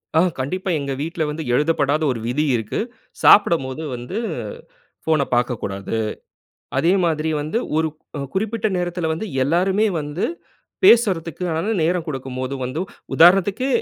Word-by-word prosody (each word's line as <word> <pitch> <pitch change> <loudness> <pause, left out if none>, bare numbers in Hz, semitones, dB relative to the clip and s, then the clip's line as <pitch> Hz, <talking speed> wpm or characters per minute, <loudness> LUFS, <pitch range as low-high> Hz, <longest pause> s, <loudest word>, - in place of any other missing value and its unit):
ஆ. - - +6 0.2
கண்டிப்பா. 185 +9 -2
எங்க 140 -1 -3
வீட்ல 165 +1 -2
வந்து 155 +2 -4
எழுதப்படாத 150 +1 +2
ஒரு 120 - -3
விதி 145 +6 0
இருக்கு. 110 -2 -2 0.4
சாப்பிடும்போது 160 -8 +5
வந்து 125 - -6 0.9
ஃபோன 155 -3 +2
பார்க்கக்கூடாது. 115 -4 -2 0.8
அதே 170 - +3
மாதிரி 160 -1 0
வந்து 155 +10 -1 0.2
ஒருக் 160 -1 0 0.4
குறிப்பிட்ட 220 +2 -1
நேரத்தில 175 -1 -2
வந்து 165 +7 -3 0.2
எல்லாருமே 185 +9 +2
வந்து 150 +4 -3 0.6
பேசுறத்துகான 180 - +3
நேரம் 170 +1 +1
குடுக்கும்போது 130 -2 -4
வந்து 130 +6 -3 0.3
உதாரணத்துக்கு 195 +7 +5
160 Hz, 115 wpm, -21 LUFS, 140-180 Hz, 0.9 s, ஆ